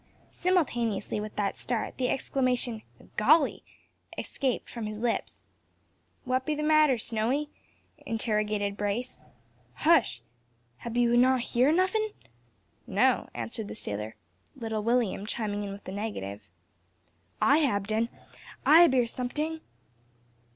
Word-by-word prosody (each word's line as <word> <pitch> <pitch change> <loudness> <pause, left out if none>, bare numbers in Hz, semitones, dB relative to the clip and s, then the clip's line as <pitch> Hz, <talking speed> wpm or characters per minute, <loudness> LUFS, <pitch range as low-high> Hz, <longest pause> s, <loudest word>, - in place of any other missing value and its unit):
Simultaneously 240 - 0
with 210 0 -6
that 200 -1 -1
start 235 -3 -3
the 250 -1 +1
exclamation 250 -4 0 0.4
"Golly!" 285 +7 +4 0.5
escaped 265 -4 -2
from 230 -3 -5
his 215 0 -5
lips. 235 +1 -2 0.8
"What 255 0 +1
be 300 +3 -1
the 300 - -3
matter, 305 -4 +5
Snowy?" 240 +7 -1 0.5
interrogated 210 -2 -1
Brace. 210 +5 -3 0.5
"Hush! 265 - +3 0.5
Hab 235 0 -5
ye 245 - +4
no 255 +2 +5
hear 250 +3 +2
nuffin'?" 395 +5 +1 0.7
"No," - - +2
answered 225 -2 -4
the - - -7
sailor, 105 - -4 0.4
little 220 -2 -3
William 225 -3 0
chiming 210 -2 -2
in 200 - -5
with 200 0 -9
the - - -7
negative. 105 - -5 0.9
"I 285 - +5
hab 205 -10 +1
den, 220 +2 0 0.6
I 320 +3 +8
hab 340 -6 +6
hear 250 -2 +4
someting." 295 +7 -3
235 Hz, 125 wpm, -28 LUFS, 210-275 Hz, 0.9 s, I